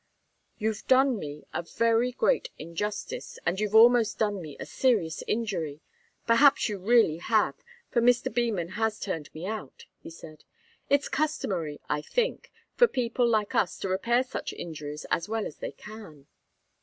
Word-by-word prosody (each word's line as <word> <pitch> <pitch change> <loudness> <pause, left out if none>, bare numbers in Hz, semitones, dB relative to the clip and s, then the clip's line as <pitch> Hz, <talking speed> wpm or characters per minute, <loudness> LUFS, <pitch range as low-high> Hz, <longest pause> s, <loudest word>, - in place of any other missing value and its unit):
"You've 220 -1 -3
done 260 -3 +4
me 150 -2 -7
a - - -1
very 230 +7 +1
great - - +1
injustice, 185 +6 -5
and 175 +2 0
you've 210 0 -1
almost 230 -1 +6
done 205 -3 0
me 150 -4 -9
a - - -5
serious 215 -11 0
injury 180 -10 -2 0.5
perhaps 270 +5 +5
you 205 -3 -4
really 215 -5 +4
have, 210 -6 +1 0.3
for 235 - +2
Mr. 245 -1 +3
Beman 220 -8 0
has 220 +2 -1
turned 165 -7 -4
me 160 +3 -7
out," 210 -9 -6 0.2
he - - -9
said. 160 -2 -12 0.5
"It's 285 0 +3
customary, 190 - -2
I 150 0 -1
think, 485 - -2 0.2
for 485 - +5
people 245 - 0
like 215 -3 +1
us 185 - +1
to 195 - -4
repair 235 +7 +2
such 260 - -5
injuries 150 -2 -7
as 170 - 0
well 225 -1 -1
as - - -7
they - - -5
can." 210 -10 -12
215 Hz, 160 wpm, -28 LUFS, 170-235 Hz, 0.5 s, almost